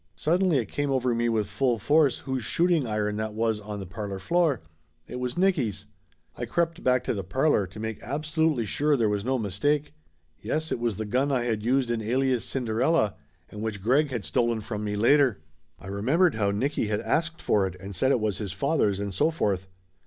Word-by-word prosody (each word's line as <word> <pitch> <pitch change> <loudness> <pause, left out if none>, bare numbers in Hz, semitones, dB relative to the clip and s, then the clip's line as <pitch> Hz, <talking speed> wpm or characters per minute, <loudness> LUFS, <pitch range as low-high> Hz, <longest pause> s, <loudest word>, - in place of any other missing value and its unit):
Suddenly 175 0 +2
it 120 - 0
come 145 +7 -2
over 130 -2 +1
me 120 0 +1
with 110 -2 +1
full 120 +5 0
force 145 +4 +3
whose 130 -2 -3
shooting 170 +1 +2
iron 105 -1 -1
that 110 0 -3
was 110 -1 0
on 105 0 -6
the 95 - -6
parlor 100 +2 -5
floor. 160 - +1 0.4
It 125 - -7
was 125 +3 -3
Nicky's! 140 - +1 0.5
I 120 - -4
crept 170 +6 -1
back 125 -1 +3
to - - -1
the 100 -3 -3
parlor 130 - +1
to 95 +4 -11
make 110 0 -4
absolutely 155 -1 0
sure 145 +7 +1
there 115 -3 +2
was 105 -1 -1
no 130 +3 0
mistake. 140 +9 -1 0.5
Yes, 155 +1 -2
it - - -1
was 120 -3 0
the 110 - -3
gun 130 +7 +1
I 125 -3 +1
had 115 -3 -1
used 125 +2 +1
in 115 -1 -1
Alias 125 +2 +1
Cinderella, 125 0 +1 0.4
and 105 - -7
which 105 -3 -4
Greg 140 +7 +3
had 120 -8 -4
stolen 115 +7 +1
from 105 0 -5
me 105 -1 -2
later. 125 +2 +4 0.4
I - - -14
remembered 130 - +2
how 105 -2 +1
Nicky 115 +4 0
had 105 0 -1
asked 165 +7 -1
for 100 -2 +2
it 90 - -7
and 100 +1 -8
said 130 +10 +2
it 130 - +3
was 105 -3 -1
his 100 -4 -4
father's 105 -3 +1
and 100 -1 -3
so 150 - +2
forth. 100 - -1
120 Hz, 210 wpm, -26 LUFS, 105-145 Hz, 0.5 s, later